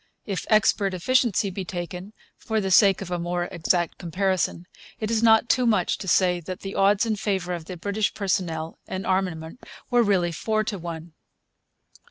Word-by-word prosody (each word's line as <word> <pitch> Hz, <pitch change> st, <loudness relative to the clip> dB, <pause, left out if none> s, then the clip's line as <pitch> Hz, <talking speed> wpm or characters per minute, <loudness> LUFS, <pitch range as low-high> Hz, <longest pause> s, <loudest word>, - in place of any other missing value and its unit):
If 195 Hz, -3 st, -4 dB
expert 205 Hz, -3 st, +3 dB
efficiency 215 Hz, -1 st, +1 dB
be 190 Hz, +1 st, -4 dB
taken, 180 Hz, +2 st, -6 dB, 0.2 s
for 220 Hz, -1 st, -2 dB
the 190 Hz, -2 st, -2 dB
sake 195 Hz, 0 st, +5 dB
of 180 Hz, -, -9 dB
a 175 Hz, -, -1 dB
more 175 Hz, +1 st, -2 dB
exact 170 Hz, 0 st, 0 dB
comparison, 185 Hz, 0 st, -1 dB, 0.3 s
it 215 Hz, 0 st, -2 dB
is 225 Hz, -1 st, +1 dB
not 225 Hz, 0 st, +5 dB
too 250 Hz, 0 st, +2 dB
much 210 Hz, -6 st, +1 dB
to 190 Hz, -, -7 dB
say 180 Hz, -1 st, +3 dB
that 185 Hz, +3 st, -7 dB
the 195 Hz, 0 st, -6 dB
odds 200 Hz, +2 st, +3 dB
in 220 Hz, -2 st, -1 dB
favour 190 Hz, -3 st, -1 dB
of 170 Hz, -2 st, -5 dB
the 180 Hz, -, -7 dB
British 205 Hz, +4 st, -1 dB
personnel 175 Hz, -5 st, -2 dB
and 190 Hz, 0 st, -4 dB
armament 185 Hz, +1 st, -2 dB, 0.3 s
were 245 Hz, -1 st, +5 dB
really 190 Hz, -6 st, +2 dB
four 215 Hz, +6 st, -1 dB
to 210 Hz, -3 st, -4 dB
one. 165 Hz, -1 st, -7 dB
190 Hz, 180 wpm, -24 LUFS, 175-210 Hz, 0.3 s, sake